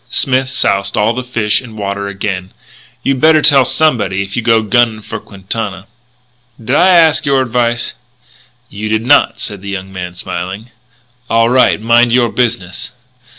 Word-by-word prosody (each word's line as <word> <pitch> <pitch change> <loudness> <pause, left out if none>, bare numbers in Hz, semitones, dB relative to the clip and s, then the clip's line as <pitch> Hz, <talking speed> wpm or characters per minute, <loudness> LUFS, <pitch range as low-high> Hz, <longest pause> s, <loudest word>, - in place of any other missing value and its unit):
Smith 130 -1 +1
soused 100 -5 0
all 105 +2 +2
the 130 +2 -4
fish 115 -3 0
in 115 -4 -12
water 100 0 -4
again: 95 -2 -4 0.5
"You'd 135 -2 -1
better 155 -1 +4
tell 140 -4 +5
somebody 105 -10 +1
if 100 0 -8
you 120 - -1
go 115 -1 +2
gunning 110 0 +1
for 115 - -6
Quintana." 100 -1 -5 0.7
"Did 120 +4 -2
I 180 - +4
ask 165 -4 +4
your 140 -1 +2
advice?" 120 -1 -1 0.7
"You 110 0 -6
did 110 +1 0
not," 145 +3 +3
said 100 -2 -6
the 100 - -8
young 95 -1 -6
man, 90 -1 -6
smiling. 95 +6 -6 0.6
"All 115 0 +3
right. 130 -4 +3
Mind 120 +2 +3
your 120 -1 +3
business." 115 -8 -2
115 Hz, 160 wpm, -14 LUFS, 100-125 Hz, 0.7 s, tell